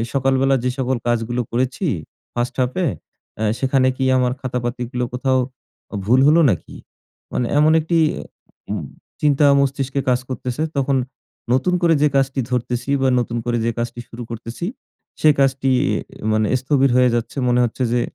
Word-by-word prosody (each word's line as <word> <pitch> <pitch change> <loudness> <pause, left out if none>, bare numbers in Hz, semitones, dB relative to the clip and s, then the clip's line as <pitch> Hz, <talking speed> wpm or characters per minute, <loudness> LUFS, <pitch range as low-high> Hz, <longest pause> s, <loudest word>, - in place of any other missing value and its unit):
সকালবেলা 135 0 +2
যে 125 - +2
সকল 130 0 0
কাজগুলো 120 +1 0
করেছি 130 +9 -1 0.5
first 120 +1 -2
half 125 0 +1
এ, - - +2 0.5
এ্যা 110 - -1
সেখানে 130 -1 +2
কি 130 - -1
আমার 125 -1 +2
খাতাপাতিগুলো 125 -1 -3
কোথাও 130 +1 +1 0.6
অ - - -1
ভুল 125 +3 +5
হলো 160 +2 +6
নাকি? 90 - -4 0.6
মানে 125 - 0
এমন 155 +1 +5
একটি 165 +2 0 0.7
উম - - -3 0.4
চিন্তা 145 0 +4
মস্তিষ্কে 140 0 0
কাজ 125 0 +2
করতেছে। 130 +2 -3 0.2
তখন 135 0 +1 0.6
নতুন 135 +8 +2
করে 170 -1 +5
যে 150 - +5
কাজটি 135 0 +1
ধরতেছি 125 +1 -2
বা, 135 - +3
নতুন 120 0 -3
করে 120 0 +1
যে - - +2
কাজটি 120 0 -3
শুরু 120 +1 -8
করতেছি। 115 +7 -5 0.5
সে 155 - +6
কাজটি 135 0 +2 0.2
ই - - +1 0.4
মানে 110 0 +2
স্থবির 135 0 +2
হয়ে 125 0 +5
যাচ্ছে। 120 +2 -3
মনে 125 0 +3
হচ্ছে 120 +3 -4
যে, 120 - +2
130 Hz, 160 wpm, -20 LUFS, 120-135 Hz, 0.7 s, হলো